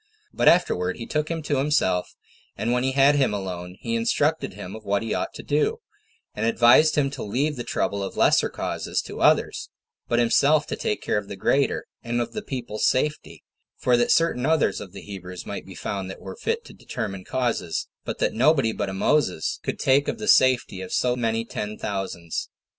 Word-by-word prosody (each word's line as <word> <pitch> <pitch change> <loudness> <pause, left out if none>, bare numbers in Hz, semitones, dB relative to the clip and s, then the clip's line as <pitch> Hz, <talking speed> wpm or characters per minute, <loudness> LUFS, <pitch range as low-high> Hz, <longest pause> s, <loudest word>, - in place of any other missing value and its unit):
But - - +1
afterward 90 - +3
he 115 - -6
took 150 +3 -1
him 165 -2 -3
to 145 -2 0
himself, 135 -11 +1 0.4
and 110 +4 -1
when 125 0 +2
he 130 0 0
had 140 +1 +5
him 135 -7 +2
alone, 90 -2 -6
he 230 - -3
instructed 230 - +1
him 100 -1 -7
in 110 - -9
what 100 +1 -1
he 115 - -2
ought - - -2
to - - -8
do; 150 - +1 0.6
and 105 - -4
advised 120 +7 +5
him 140 -2 +1
to 140 - -7
leave 140 +9 -1
the 120 - -5
trouble 100 -3 -1
of 95 - -5
lesser - - +4
causes - - -3
to - - -8
others, - - +2 0.4
but 120 - +1
himself 140 +6 +4
to - - -4
take 105 - -2
care 105 - +1
of 100 - -10
the 100 - -6
greater, 135 +8 +1 0.2
and 120 0 -2
of 120 - -3
the 215 - -3
people's 120 - -2
safety, 150 +4 -1 0.3
for 125 - +3
that 120 0 +2
certain 165 -7 +3
others 160 +2 +2
of 100 -3 -9
the - - -9
Hebrews 90 -3 -8
might - - -6
be - - -10
found 95 -2 -4
that 95 - -8
were 95 - -8
fit 465 0 -2
to - - -12
determine 100 -6 -5
causes, 120 -10 -2 0.2
but - - -4
that - - 0
nobody 130 -1 +3
but 100 -3 -3
a - - -5
Moses 95 - +1
could - - -3
take 135 +2 +3
of - - -2
the 215 - -5
safety 130 - +4
of 95 - -7
so 125 -1 +1
many 115 -2 -1
ten 105 -2 -5
thousands. 95 -4 -4
120 Hz, 210 wpm, -24 LUFS, 100-145 Hz, 0.6 s, had